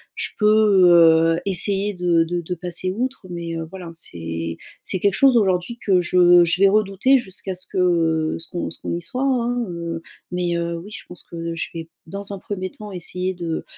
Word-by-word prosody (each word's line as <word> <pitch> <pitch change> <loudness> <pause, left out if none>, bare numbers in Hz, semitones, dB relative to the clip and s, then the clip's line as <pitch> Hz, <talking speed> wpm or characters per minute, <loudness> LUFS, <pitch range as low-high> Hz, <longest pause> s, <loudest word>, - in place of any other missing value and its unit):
je - - -3
peux, 210 -4 +5
heu, 165 -1 +6
essayer 200 +1 0
de 175 -2 +2
de 175 +1 -2
de 180 +2 -4
passer 180 +1 -3
outre, 250 +2 -3
mais, 170 -1 -5
heu, 165 - -3
voilà. 180 -2 -8
C'est 85 - -6 0.3
c'est 185 - -2
quelque 200 0 +2
chose 265 +2 +5
aujourd'hui 190 +2 +1
que 185 -3 +4
je 175 0 +5
je 170 +3 0
vais 195 - +8
redouter 215 +6 +3
jusqu'à 190 -3 -6
ce 185 - -10
que 165 -3 +1
ce 165 - -6
qu'on 175 - -3
ce - - -13
qu'on - - -4
y 170 - -2
soit, 255 +9 -3
hein. 245 -2 0
Heu, 170 -1 -5 0.3
mais 175 -1 -1
heu, 170 0 -2
oui 195 +5 -11
je - - -9
pense 180 - -12
que 165 0 -6
je 165 - -4
vais 165 -1 -6 0.2
dans 200 +3 -6
un 195 - -6
1er 185 -1 -5
temps 210 -1 -10
essayer 180 +1 -3
de 170 -3 -4
180 Hz, 205 wpm, -21 LUFS, 170-200 Hz, 0.3 s, vais